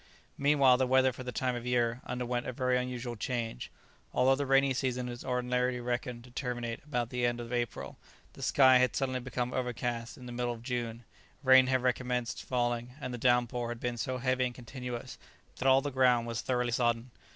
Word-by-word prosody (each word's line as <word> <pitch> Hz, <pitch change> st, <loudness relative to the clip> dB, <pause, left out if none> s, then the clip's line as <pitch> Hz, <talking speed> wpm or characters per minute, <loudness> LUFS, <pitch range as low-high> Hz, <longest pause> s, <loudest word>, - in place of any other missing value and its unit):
Meanwhile 140 Hz, -3 st, +5 dB
the 130 Hz, 0 st, +1 dB
weather 130 Hz, 0 st, +4 dB
for 130 Hz, -, -9 dB
the 125 Hz, -, -4 dB
time 125 Hz, 0 st, -1 dB
of 120 Hz, -, -5 dB
year 120 Hz, -1 st, 0 dB
underwent 125 Hz, 0 st, -2 dB
a -, -, -1 dB
very 125 Hz, +1 st, +1 dB
unusual 125 Hz, -1 st, -3 dB
change. 115 Hz, -, -3 dB, 0.5 s
Although 130 Hz, +1 st, +5 dB
the 140 Hz, 0 st, -2 dB
rainy 135 Hz, 0 st, +4 dB
season 125 Hz, -1 st, -1 dB
is 120 Hz, 0 st, -7 dB
ordinarily 125 Hz, 0 st, 0 dB
reckoned 120 Hz, 0 st, -3 dB
to 125 Hz, -, -15 dB
terminate 120 Hz, -2 st, -4 dB
about 125 Hz, -5 st, -2 dB
the 125 Hz, -1 st, -2 dB
end 120 Hz, 0 st, +1 dB
of 120 Hz, +1 st, -6 dB
April, 120 Hz, -2 st, -3 dB, 0.3 s
the -, -, -12 dB
sky 130 Hz, -2 st, +6 dB
had 125 Hz, -3 st, +2 dB
suddenly 130 Hz, -2 st, 0 dB
become 125 Hz, 0 st, -3 dB
overcast 120 Hz, -2 st, -3 dB
in 125 Hz, -, -11 dB
the 120 Hz, -, -7 dB
middle 120 Hz, 0 st, -1 dB
of 115 Hz, -1 st, -11 dB
June, 120 Hz, -2 st, -3 dB, 0.4 s
rain 130 Hz, -1 st, +7 dB
had 130 Hz, -1 st, +1 dB
recommenced 125 Hz, -1 st, -1 dB
falling, 120 Hz, 0 st, -1 dB
and 130 Hz, -3 st, -5 dB
the 120 Hz, -, -5 dB
downpour 120 Hz, -1 st, +2 dB
had 120 Hz, -1 st, -5 dB
been 120 Hz, 0 st, -2 dB
so 130 Hz, +2 st, -2 dB
heavy 130 Hz, 0 st, +1 dB
and 125 Hz, -1 st, -4 dB
continuous 125 Hz, 0 st, -7 dB, 0.4 s
that 130 Hz, -, -1 dB
all 135 Hz, 0 st, +6 dB
the 145 Hz, +1 st, -3 dB
ground 125 Hz, -3 st, +3 dB
was 115 Hz, 0 st, -3 dB
thoroughly 125 Hz, -1 st, 0 dB
sodden. 120 Hz, 0 st, 0 dB
125 Hz, 200 wpm, -31 LUFS, 120-130 Hz, 0.5 s, rain